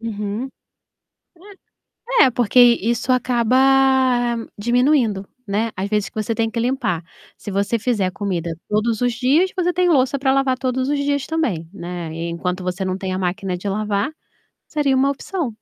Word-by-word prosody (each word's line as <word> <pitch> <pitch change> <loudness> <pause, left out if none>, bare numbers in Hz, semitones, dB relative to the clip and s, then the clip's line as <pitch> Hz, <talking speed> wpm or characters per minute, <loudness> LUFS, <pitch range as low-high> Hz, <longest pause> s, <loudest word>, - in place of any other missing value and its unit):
Uhum, 215 +2 -4 1.7
é. - - +9
É 255 - +4
porque 245 0 +1
i 235 -2 +5
isso 245 +2 0
acaba 250 -1 +1 1.0
diminuindo, 240 -3 +2 0.2
né, 215 +3 -1
as 190 +2 -2
vezes 210 -3 0
que - - -29
você 215 +1 -2
tem 225 0 0
que 230 - -4
limpar. 235 - -1 0.3
Se - - -8
você 200 +4 0
fizer 210 -5 0
comida 180 -3 -3 0.2
todos 215 +1 0
os 245 -1 +1
dias, 275 +10 +2
você 360 -1 +1
tem 360 0 +2
louça 275 -3 +2
para 265 0 +2
lavar 270 -1 +1
todos 260 0 -1
os 290 0 0
dias 285 -1 -1
também, 230 - -2
né. 175 -4 -6
E 165 +1 -4
enquanto 180 +2 -3
você 185 +1 -2
não 185 0 -2
tem 190 -1 -4
a 185 - -2
máquina 185 0 -2
de 200 +3 -5
lavar, 210 +2 -1 0.6
seria 285 -3 +1
uma 270 +1 +3
opção. 290 -1 -4
230 Hz, 175 wpm, -20 LUFS, 195-260 Hz, 1.7 s, é